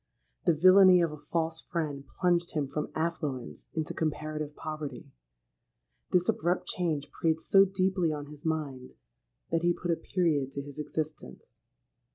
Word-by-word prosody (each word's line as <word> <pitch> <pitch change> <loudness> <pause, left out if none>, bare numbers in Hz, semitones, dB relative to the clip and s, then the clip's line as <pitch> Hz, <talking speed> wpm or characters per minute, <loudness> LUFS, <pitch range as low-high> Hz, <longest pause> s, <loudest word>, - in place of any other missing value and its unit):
The 170 - +5
villany 185 +2 +7
of 165 - 0
a 150 -1 -11
false 165 -1 0
friend 150 -5 -3
plunged 175 -1 0
him 145 -3 0
from 150 +2 -4
affluence 150 - -3
into 160 -2 -2
comparative 155 -1 -3
poverty. 155 -5 -6 1.0
This 180 -1 +2
abrupt 175 +3 +1
change 160 -5 -2
preyed 160 -1 0
so 195 +4 +5
deeply 185 -3 +1
on 145 -1 -4
his 150 +1 -13
mind, 145 -6 -3 0.6
that 165 0 +2
he 175 0 +3
put 175 - -2
a - - +3
period 155 -7 0
to 140 - -4
his 145 +1 -10
existence. 150 - -6
160 Hz, 150 wpm, -29 LUFS, 145-175 Hz, 1.0 s, villany